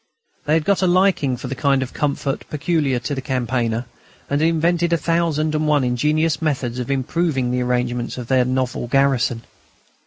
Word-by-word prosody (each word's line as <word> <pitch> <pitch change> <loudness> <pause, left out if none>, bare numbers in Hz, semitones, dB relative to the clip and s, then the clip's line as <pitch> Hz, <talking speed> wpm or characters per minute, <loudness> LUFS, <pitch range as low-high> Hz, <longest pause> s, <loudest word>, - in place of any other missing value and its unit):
They 150 +1 +2
had 160 -1 0
got 200 -1 +2
a 185 - +3
liking 175 -8 +2
for 125 - -6
the 130 - -3
kind 135 -1 +1
of 130 - -8
comfort 140 -1 -2
peculiar 150 -3 0
to 120 +4 -3
the 135 - -3
campaigner, 120 -3 -1 0.5
and 145 +1 +1
had 160 - +4
invented 170 +1 +1
a 170 - +3
thousand 165 -2 0
and 155 0 0
one 150 -2 +3
ingenious 150 +4 +1
methods 130 -6 -1
of 125 - -4
improving 135 -1 0
the 125 0 0
arrangements 125 -1 -1
of 125 - -5
their 130 +1 +3
novel 125 -1 -2
garrison. 130 -3 +1
140 Hz, 185 wpm, -20 LUFS, 125-155 Hz, 0.5 s, had